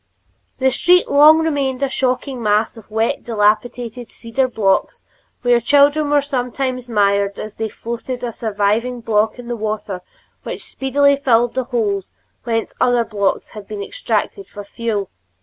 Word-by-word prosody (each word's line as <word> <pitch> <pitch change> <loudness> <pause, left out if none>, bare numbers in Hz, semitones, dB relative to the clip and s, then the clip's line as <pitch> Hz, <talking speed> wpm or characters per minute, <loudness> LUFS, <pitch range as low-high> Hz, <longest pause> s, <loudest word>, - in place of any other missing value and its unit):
The 265 0 +2
street 360 +7 +4
long 300 +2 +7
remained 280 -5 -1
a - - +3
shocking 260 0 -2
mass 210 +1 +1
of 225 -2 -14
wet, 220 +1 -1
dilapidated 230 +2 0
cedar 250 +3 -1
blocks, 205 -6 0 0.4
where 245 -1 +4
children 285 +3 +4
were 290 -1 +3
sometimes 255 -2 -3
mired 200 -2 +1
as 215 - -6
they 220 0 -2
floated 235 +3 -6
a 240 - -2
surviving 220 +3 -1
block 220 0 +1
in 245 -1 -10
the 240 - -2
water 215 -4 -4 0.4
which - - -6
speedily 280 +1 +2
filled 240 -3 +2
the 260 -1 -1
holes 210 -6 -1 0.3
whence 225 -2 -1
other 245 -1 +3
blocks 200 -3 -1
had 210 -2 -10
been 205 -2 -5
extracted 405 - -2
for 205 - -9
fuel. 205 -1 -3
235 Hz, 150 wpm, -19 LUFS, 215-265 Hz, 0.4 s, long